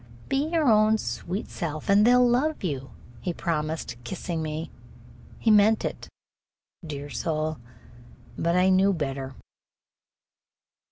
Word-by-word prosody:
"Be 275 +3 +1
your 320 -3 +1
own 215 -1 +5
sweet 180 - -4
self 155 -4 -4
and 205 +2 +5
they 245 - +6
'll 250 0 +5
love 265 +5 +1
you," 135 -7 -3 0.3
he 180 - -2
promised, 155 -7 -3
kissing 165 +7 -4
me. 155 +1 -4 0.7
He 225 - +2
meant 215 +1 +5
it, - - -5 0.7
dear 145 -2 -6
soul; 155 -2 -2 0.8
but 170 +1 0
I 180 +1 +4
knew 190 +1 +4
better. 135 -4 -4
175 Hz, 125 wpm, -26 LUFS, 155-215 Hz, 0.8 s, they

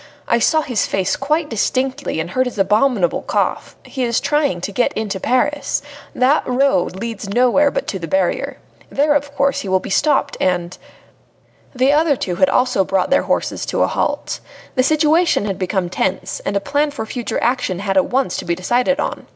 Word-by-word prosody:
"I 235 - +2
saw 315 +7 +3
his 245 -7 -1
face 190 -1 0
quite 300 +3 0
distinctly 260 - -1
and 165 +2 -4
heard 255 +3 +1
his 245 - -7
abominable 210 -1 +2
cough. - - -2
He 265 - -4
is 235 -1 +1
trying 295 -11 0
to 200 - -4
get 240 +5 +1
into 205 -3 -3
Paris. 280 +7 0 0.3
That 265 +4 +3
road 255 -8 +1
leads 220 0 -5
nowhere 250 +6 +3
but - - -3
to 190 - -3
the 165 - -5
barrier. 190 +1 0 0.3
There, 295 +1 +2
of 285 0 -2
course, 275 0 +1
he 195 - -6
will 190 0 +3
be 185 - -8
stopped, 300 +8 +1
and 180 -1 0 0.5
" - - -34
The 260 +3 +3
other 305 -1 +3
two 180 -7 -3
had 280 - +4
also 250 -5 +2
brought 190 +2 0
their 275 - +4
horses - - -1
to - - +1
a - - +2
halt. - - -2 0.3
The 255 - +2
situation 310 - +3
had 195 -3 -3
become 185 -1 -1
tense, 185 +1 -2
and 200 - 0
a - - +2
plan 290 +8 0
for 280 -6 -5
future 240 +1 -4
action 245 -6 0
had 195 0 -2
at 190 - +4
once 260 -7 0
to - - -5
be 170 - 0
decided 245 - +1
on. - - -3
245 Hz, 200 wpm, -19 LUFS, 195-280 Hz, 0.5 s, had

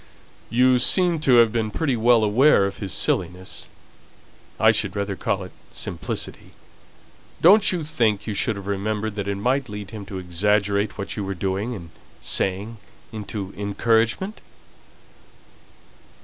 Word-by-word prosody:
"You 125 +2 +4
seem 175 +5 +3
to 135 -4 +3
have 115 -2 +6
been 110 -1 -1
pretty 135 +3 -1
well 115 0 +4
aware 110 +1 +4
of 100 - -5
his 100 -3 -4
silliness 90 +2 -1 0.9
(I - - +6
should - - -1
rather 100 -1 -2
call 95 +1 -2
it 90 - -10 0.2
simplicity). - - -5 0.9
Don't 200 +5 +7
you 175 -3 -2
think 115 -10 0
you 110 - -3
should 110 +3 0
have 100 -1 -8
remembered 105 +2 -2
that 100 -1 -4
it 100 - -1
might 125 +6 0
lead 105 -1 -7
him 105 -3 -8
to 95 - -6
exaggerate 100 +3 0
what 100 -1 -4
you 105 - -2
were 95 0 -4
doing 100 +6 -2
and 85 -5 -10 0.3
saying 100 +4 -1 0.3
into 105 -3 -6
encouragement?" 115 - 0
105 Hz, 145 wpm, -23 LUFS, 100-120 Hz, 0.9 s, Don't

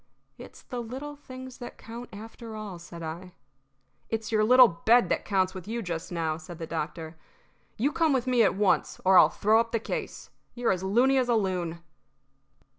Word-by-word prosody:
"It's - - -12
the 250 - -6
little 265 +5 -6
things 260 -2 -11
that 245 - -9
count, 235 +2 -9
after 225 +2 -9
all," 205 -5 -7
said 170 0 -10
I. 175 +3 -7 0.8
"It's 220 0 -3
your 215 -1 +3
little 250 +3 +8 0.2
bed 240 +2 +5
that - - -1
counts 190 -2 +1
with 185 -1 -9
you 230 +1 -3
just 170 -2 -5
now," 160 -2 -1
said 165 +1 -10
the 165 - -5
doctor. 160 0 -5 0.6
"You 270 +7 +1
come 320 0 +2
with 260 -3 +1
me 250 -2 +3
at 210 - +3
once, 200 -1 +1
or 190 0 +7
I'll - - +7
throw 215 +2 +3
up 230 0 -1
the 230 - 0
case. - - -6 0.2
'You're 240 -1 +1
as 185 -1 -1
loony 245 +8 +3
as 250 -1 0
a 240 - +4
loon." 180 -5 -2
215 Hz, 190 wpm, -27 LUFS, 180-245 Hz, 0.8 s, little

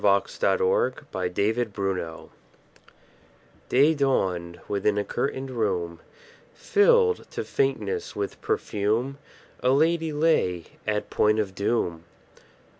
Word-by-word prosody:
W 100 - +5
X. - - -8
Y - - +4
Z 95 - +2 1.0
History 120 - -1
of 110 -4 -5
a 95 -1 +1
Life 85 -3 -6 1.4
DAY 140 +5 +5
dawned: 90 - 0
within 100 +1 0
a 105 - +1
curtained 130 +1 -3
room, 90 -8 -1 0.6
Filled 455 +2 +3
to - - -4
faintness 440 +2 -1
with 405 0 -4
perfume, 125 - -1 0.4
A 125 - +1
lady 160 +4 +2
lay 145 - +1 0.2
at 105 -1 -1
point 105 +1 +3
of 105 -3 -1
doom. 95 -5 -1
110 Hz, 120 wpm, -26 LUFS, 95-155 Hz, 1.4 s, W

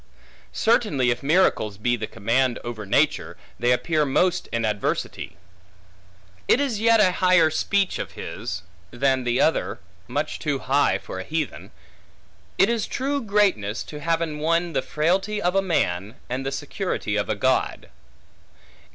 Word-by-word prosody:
Certainly 210 - +2
if 120 - -2
miracles 140 - +2
be 120 +3 +1
the 110 -2 -4
command 120 +4 0
over 110 -3 -6
nature, - - +1 0.2
they 120 +1 +2
appear 155 +5 +2
most 180 +6 +1
in 115 -1 -1
adversity. 105 -5 -2 1.1
It - - +4
is 265 -7 -1
yet 230 0 +4
a 190 -3 +5
higher 180 -3 +4
speech 195 +4 0
of - - -5
his, 85 0 -6 0.3
than 130 +1 +1
the 120 +1 +1
other 160 - +1 0.3
(much 150 +2 -2
too 145 -3 -1
high 135 -7 +2
for 95 - -8
a - - -4
heathen), 155 +2 -4 0.9
It 195 - +5
is 230 -2 -1
true 280 +1 -1
greatness, 200 - +1
to 150 - -9
have 165 +2 0
in 155 -2 -4
one 165 +2 +1
the 135 - +1
frailty 190 +9 0
of 180 -2 +1
a 195 - +3
man, 105 - -1
and 130 +2 -3
the 135 - -2
security 140 - -3
of 105 - -1
a 110 - +1
God. 130 +6 0
150 Hz, 155 wpm, -24 LUFS, 120-185 Hz, 1.1 s, a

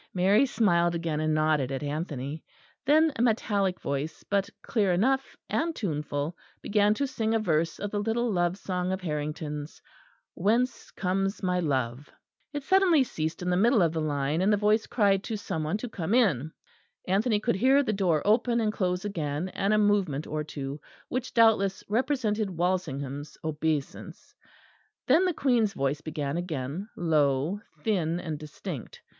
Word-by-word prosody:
Mary 195 +8 +4
smiled 175 -8 +2
again 165 -2 -2
and 155 0 +1
nodded 155 -3 +2
at 135 +1 -3
Anthony. 145 -1 -4 0.4
Then, 310 +1 +5
a - - -1
metallic 205 -5 +1
voice, 140 +3 -4
but 200 0 0
clear 205 -5 +1
enough 265 +9 +1
and 330 0 -1
tuneful, 150 -4 -3 0.3
began 210 0 +3
to 280 - 0
sing 225 -4 -1
a - - +3
verse 165 -5 0
of 205 0 -4
the 205 - -1
little 225 +3 0
love 175 -1 +1
song 180 -2 -2
of 190 - -1
Harrington's, 150 -2 -4 0.5
Whence 235 +5 0
comes 195 +2 -2
my 180 -1 +1
love? 130 -4 -1 0.4
It 290 -1 -4
suddenly 365 -4 +4
ceased 160 -7 -4
in 180 - 0
the 180 - +2
middle 225 0 +4
of 165 -1 +1
the 160 - -1
line, 145 +1 0
and 195 +3 +3
the 210 - +4
voice 210 +2 +2
cried 200 -4 +2
to 220 - -3
some 180 -6 -3
one 160 +7 0
to 245 - -5
come 200 -1 -2
in. 160 - +2 0.6
Anthony 210 +4 +2
could 235 -1 0
hear 265 +6 +4
the 220 - -1
door 180 -7 +1
open 235 +3 +3
and 215 -2 0
close 180 -1 -1
again, 160 -3 -2
and 195 +2 -1
a 215 - +4
movement 200 -9 +2
or 155 0 -3
two, 145 -1 -6 0.3
which 255 0 -3
doubtless 210 -4 +4
represented 220 -3 0
Walsingham's 155 -5 -2
obeisance. 155 -2 -3 0.7
Then 315 +8 +4
the 365 - +2
Queen's 235 -8 +2
voice 140 -1 -1
began 150 -1 -3
again, 165 +2 -4
low, 155 +1 +1 0.2
thin, 175 -6 0
and 155 -4 -4
distinct. 150 -1 -7
185 Hz, 165 wpm, -28 LUFS, 155-215 Hz, 0.7 s, Then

